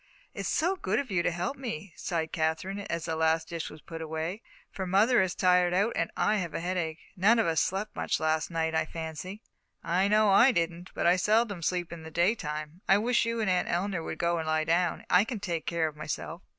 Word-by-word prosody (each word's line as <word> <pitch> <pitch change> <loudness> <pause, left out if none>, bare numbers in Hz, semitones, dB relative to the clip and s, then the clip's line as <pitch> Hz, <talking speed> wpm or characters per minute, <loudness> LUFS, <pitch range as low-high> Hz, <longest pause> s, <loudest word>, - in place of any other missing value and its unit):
"It's - - -4
so 355 +3 +1
good 200 - -1
of 265 -5 -2
you 180 -2 +2
to - - +1
help 175 +11 -3
me," 205 - -6
sighed 165 -3 -3
Katherine, 160 +4 -1
as 170 -1 -2
the 165 -1 -2
last 160 0 +1
dish 170 -2 -4
was 155 - -13
put 165 -1 -8
away; 160 +6 -4 0.3
"for 190 -1 -4
mother 210 +6 +4
is 185 -1 -1
tired 180 -1 +3
out, 205 +5 +2
and - - 0
I 215 +1 +2
have 175 -5 -3
a - - -1
headache. 170 -2 -2 0.2
None 210 +5 +4
of 225 - +3
us 165 -1 +2
slept 195 +3 -2
much - - -1
last 155 0 0
night, 165 -1 -1
I 160 - +2
fancy." 165 +6 -7 0.4
"I 185 +3 +2
know 210 0 +4
I 240 +7 +7
didn't, 170 0 -2
but - - -1
I 175 +2 +5
seldom 210 -1 +2
sleep 175 0 -1
in 170 - -8
the 160 - -9
daytime. 160 -2 -1
I 195 - +7
wish 235 +3 +2
you 230 0 -1
and 210 - +1
Aunt 180 -1 +1
Eleanor 180 0 -1
would 160 - -5
go 170 0 +1
and 160 - -4
lie 155 0 +1
down. 170 +2 0
I 180 +2 +5
can 225 -1 -5
take 175 -5 -3
care 170 -1 +1
of 155 - -7
myself." 155 +3 -5
175 Hz, 230 wpm, -29 LUFS, 160-200 Hz, 0.4 s, I